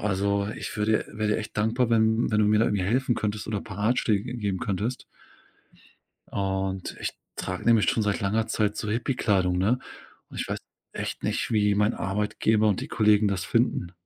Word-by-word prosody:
also, 100 0 0
ich - - -5
würde 105 +1 +1
wäre 110 0 -1
dir - - +1
echt 110 -1 -6
dankbar, 115 +3 +1
wenn 110 0 +3
wenn 105 - +2
du 105 - +4
mir 105 0 +4
da 115 - +4
irgendwie 100 -4 0
helfen 120 +4 +1
könntest 105 0 -3
oder 105 -2 -2
paar 100 -2 -9
Ratschläge 110 -2 +2
g 125 - -5
geben 100 -5 -2
könntest. 110 +3 -2 1.3
Und 95 -1 -2
ich - - -2 0.2
trage 95 0 -4
nämlich 115 -6 +4
schon 110 - 0
seit 105 +1 0
langer 110 +3 0
Zeit 105 -2 0
so 105 - -3
Hippie-Kleidung, 105 -6 +1
ne? 105 +7 +2 0.5
Und - - -6
ich - - -4
weiß - - -2 0.3
echt - - -5
nicht, - - -1
wie 105 -1 +3
mein 105 +3 +2
Arbeitgeber 105 +3 +1
und 100 - +1
die - - -6
Kollegen 105 -1 +3
das 95 -3 -2
finden. 90 0 0
105 Hz, 190 wpm, -26 LUFS, 100-110 Hz, 1.3 s, du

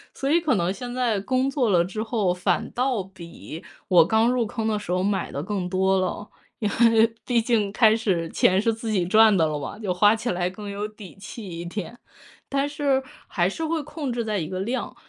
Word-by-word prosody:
所 275 +1 -1
以 340 +2 +4
可 300 -7 +1
能 180 -1 0
现 245 +5 -7
在 245 -4 0
工 255 +6 0
作 260 -5 +1
了 175 -3 +3
之 205 +4 -5
后， 220 -5 0
反 180 -1 -1
倒 250 -4 0
比 175 -2 -11 0.3
我 175 -3 +7
刚 220 +7 +2
入 250 -1 +1
坑 220 +1 -3
的 215 -1 0
时 190 - -6
候 180 +1 +1
买 200 0 -1
得 140 - -4
更 190 -1 -3
多 190 +1 +2
了。 185 +2 -3 0.3
因 215 - 0 0.2
为 225 0 +5 0.2
毕 245 -2 +1
竟 225 -3 +1
开 220 0 +5
始 185 -7 -1
钱 185 +3 +3
是 225 +2 +1
自 225 +1 -6
己 190 -4 +1
赚 215 +3 +5
的 165 - +3
了 155 -1 -2
吧， 145 - -6
就 205 -4 -2
花 205 +4 +5
起 225 +2 -3
来 180 0 -1
更 205 +3 -9
有 200 +1 -4
底 210 -3 -13
气 205 +2 -9
一 170 -1 -6
点。 200 +5 -6 0.5
但 275 0 0
是 285 -2 0 0.2
还 175 -3 +1
是 210 +12 -4
会 320 -1 -1
控 295 -3 -5
制 235 -1 -2
在 210 -2 -1
一 160 - -3
个 185 +2 -4
量， 240 +6 -3
210 Hz, 245 characters per minute, -24 LUFS, 185-240 Hz, 0.5 s, 我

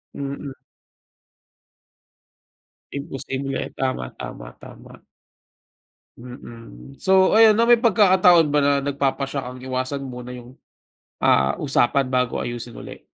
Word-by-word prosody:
Mm. 140 0 -6 2.4
Imposible, 135 -1 -5
tama, 130 - -3
tama, - - -9
tama. - - -14 1.2
Mm, 115 - -12
so 190 0 +3
ayon 220 -1 +7
'no, 230 - +3
may 240 0 +5
pagkakataon 185 - +4
ba 150 - +3
na 145 0 +3
nagpapasiya 140 -1 -2
kang 125 0 -10
iwasan 130 +2 -3
muna 125 -1 -8
yung, 125 +1 -13 0.6
ah, 70 +1 +2
usapan 135 -1 +1
bago 125 -1 -1
ayusin 120 0 -6
ulit? - - -11
135 Hz, 105 wpm, -22 LUFS, 125-145 Hz, 2.4 s, ayon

